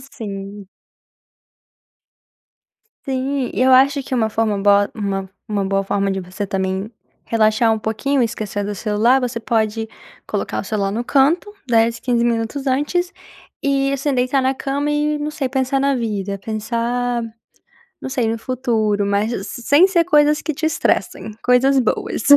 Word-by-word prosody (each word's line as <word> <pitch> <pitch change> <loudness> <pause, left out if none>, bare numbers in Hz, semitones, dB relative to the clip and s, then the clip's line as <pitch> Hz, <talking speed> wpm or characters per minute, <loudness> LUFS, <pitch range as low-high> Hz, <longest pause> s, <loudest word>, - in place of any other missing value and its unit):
Sim. 205 -6 -8 2.4
Sim, 265 0 -2
eu 260 +1 +3
acho 275 +2 +5
que 260 - -4
uma 225 -3 +1
forma 215 -2 0
boa 205 0 +4
uma 195 -3 -3 0.2
uma 205 -2 -1
boa 195 0 0
forma 195 0 0
de 190 0 -2
você 185 +3 -5
também 190 +2 -2 0.3
relaxar 225 0 +3
um 220 - 0
pouquinho 225 +6 -1
e - - +4
esquecer 210 -2 -3
do 205 +1 -3
celular, 220 +6 +2
você 245 -2 -2
pode 225 -1 -1 0.4
colocar - - -2
o - - -8
celular 200 -3 -1
no 230 +4 -3
canto, 300 - +2
10, 230 -1 +2
15 240 -2 +1
minutos 235 +4 -1
antes 295 +7 0 0.5
e 275 0 +1
assim, 275 +1 -1
deitar 255 +2 +1
na 260 +1 +1
cama 280 +2 -2
e 295 0 0
não 295 +1 -3
sei, 275 -3 -3
pensar 265 +1 0
na 275 0 +2
vida, 205 -4 -3
pensar, 235 +3 -2 0.8
não - - -5
sei 250 -4 0
no 225 +1 -1
futuro, 220 -4 0
mas 205 +3 0
as 195 -2 -4
sem 285 +8 +3
ser 345 -3 +2
coisas 300 0 +3
que 315 - -2
te 315 - -2
estressem, 220 -7 -1
coisas 260 +2 +4
boas. 220 -2 -1
235 Hz, 160 wpm, -19 LUFS, 210-270 Hz, 2.4 s, acho